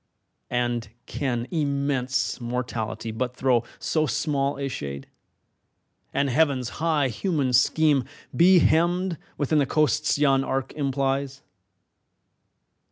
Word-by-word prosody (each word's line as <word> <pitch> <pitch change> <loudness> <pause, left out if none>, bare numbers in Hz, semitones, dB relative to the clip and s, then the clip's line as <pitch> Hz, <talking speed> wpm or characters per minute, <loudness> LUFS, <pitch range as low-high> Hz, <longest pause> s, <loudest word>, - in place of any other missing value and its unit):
And 120 -2 -1 0.2
can 120 -4 -2
immense 140 -4 -1
Mortality 120 -2 -3
but 125 +3 -3
throw 125 -3 +2
So 155 -1 0
small 140 +1 -1
a 140 0 -2
shade, 70 - -6 1.1
and 140 0 +1
Heaven's 135 -3 +1
high 155 -4 +2
human 135 - -1
scheme 140 +2 +3 0.3
Be 180 +2 +6
hemmed 175 +2 +2 0.2
within 150 +1 +1
the 140 - +1
coasts 150 -3 +1
yon 135 -2 +3
arc 135 0 -2
implies? 135 -1 -2
135 Hz, 105 wpm, -25 LUFS, 125-150 Hz, 1.1 s, Be